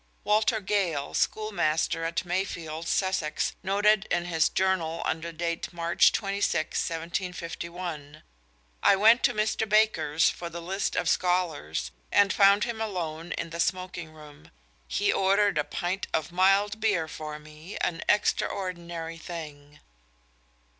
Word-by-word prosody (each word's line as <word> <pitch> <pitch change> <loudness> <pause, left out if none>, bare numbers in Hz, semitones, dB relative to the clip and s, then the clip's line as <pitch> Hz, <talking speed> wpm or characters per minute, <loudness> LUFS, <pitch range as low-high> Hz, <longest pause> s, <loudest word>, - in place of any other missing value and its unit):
Walter 220 +2 +2
Gale, 180 -8 -1
schoolmaster 165 -6 0
at 165 +2 -2
Mayfield, 170 -3 -3
Sussex, 185 -6 0
noted 205 +1 +3
in 175 0 0
his 165 -2 +2
Journal 185 -4 0
under 165 +1 -2
date 170 +1 -3
March 170 0 +3
26, 195 -6 0 0.2
1751: 170 -2 -5 0.6
"I - - +6
went 225 +5 +6
to - - +3
Mr. 215 0 0
Baker's 210 -8 +3
for 170 - -3
the 170 +1 -7
list 190 +4 -2
of - - 0
scholars, 160 - 0 0.2
and 200 -1 +4
found 200 0 +5
him 230 -2 -3
alone 170 -6 -4
in 170 0 -5
the 170 - -6
smoaking 170 -1 -2
room; 150 -2 -15 0.4
he 205 - +1
ordered 195 -2 +3
a - - +2
pint 180 +5 -3
of 160 +1 -2
mild 195 +4 +3
beer 200 -8 +1
for 155 -1 -6
me, 155 +5 -11
an 170 -1 -1
extraordinary 170 -5 -1
thing." 150 -4 -9
175 Hz, 130 wpm, -27 LUFS, 160-195 Hz, 0.6 s, I